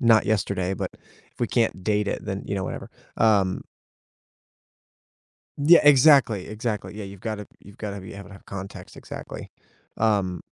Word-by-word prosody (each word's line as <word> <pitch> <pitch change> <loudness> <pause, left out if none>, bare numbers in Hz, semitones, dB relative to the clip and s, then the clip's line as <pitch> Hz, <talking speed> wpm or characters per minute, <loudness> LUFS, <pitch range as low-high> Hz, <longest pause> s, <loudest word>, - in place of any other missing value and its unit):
not 115 -4 +5
yesterday, 100 -3 0
but - - -3 0.4
if - - -26
we 120 - +2
can't 115 -6 +1
date 105 -1 +1
it, - - -3
then, 95 +1 -4
you 100 - -2
know, 95 -1 -2
whatever. - - -5 0.3
Um 100 -4 +3 2.0
Yeah, 155 +4 +7
exactly, 135 -8 +6
exactly. 110 0 -3
Yeah, 105 -1 -6
you've 100 -1 -10
gotta 105 -1 -4
you've 100 +1 -16
gotta 100 -2 -5
be 95 - -9
able 100 0 -9
to 100 - -12
have - - -16
context, 100 0 -8
exactly. - - -8 0.5
Um 100 -6 +1
105 Hz, 160 wpm, -25 LUFS, 95-110 Hz, 2.0 s, Yeah